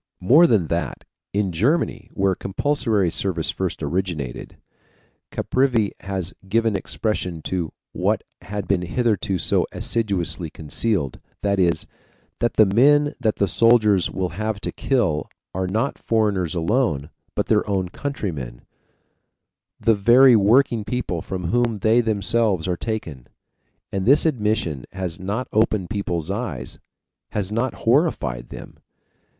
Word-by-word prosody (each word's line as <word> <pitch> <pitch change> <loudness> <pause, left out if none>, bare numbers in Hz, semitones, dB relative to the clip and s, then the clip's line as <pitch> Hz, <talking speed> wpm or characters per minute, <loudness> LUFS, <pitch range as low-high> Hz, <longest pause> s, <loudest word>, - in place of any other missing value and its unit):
More 145 - +6
than 105 - +3
that, 85 -5 -2 0.3
in 100 -2 0
Germany, 115 - 0
where 95 -1 +2
compulsory 105 - 0
service 85 -4 -1
first - - -3
originated, 85 -9 -3 0.7
Caprivi 125 -6 +1
has 95 -2 -3 0.2
given 115 0 +2
expression 95 -4 -3
to 90 -4 -2 0.2
what - - 0 0.2
had 105 0 -5
been 100 -3 +1
hitherto 100 0 0
so 80 - +2
assiduously 95 -6 -1
concealed 75 - -1 0.2
that 100 -1 +1
is, 85 -2 +2 0.5
that 120 - 0
the 110 - +6
men 145 +8 +4
that 110 - +1
the 100 - +1
soldiers 110 -4 +4
will 95 -1 -2
have 110 +4 -3
to - - -3
kill 105 - 0 0.2
are 95 0 -2
not 110 +9 -1
foreigners 100 -7 0
alone, 85 - 0 0.2
but - - 0
their - - +1
own 95 -3 0
countrymen, 80 - -5 1.2
the 115 - +3
very 120 +5 +6
working 115 +2 +3
people 100 -8 -3
from 90 -1 -4
whom 120 -2 +1
they 110 +4 +3
themselves 105 -4 0
are 90 - 0
taken. 85 - -5 0.6
And 95 +1 -2
this 140 +5 +6
admission 105 - 0
has 90 -3 -4
not 100 +7 -3
opened 105 -3 +1
people's 90 -5 -2
eyes, 85 - -4 0.5
has 100 -1 -2
not 115 +4 -1
horrified 115 - +1
them! - - -10
100 Hz, 130 wpm, -22 LUFS, 90-115 Hz, 1.2 s, More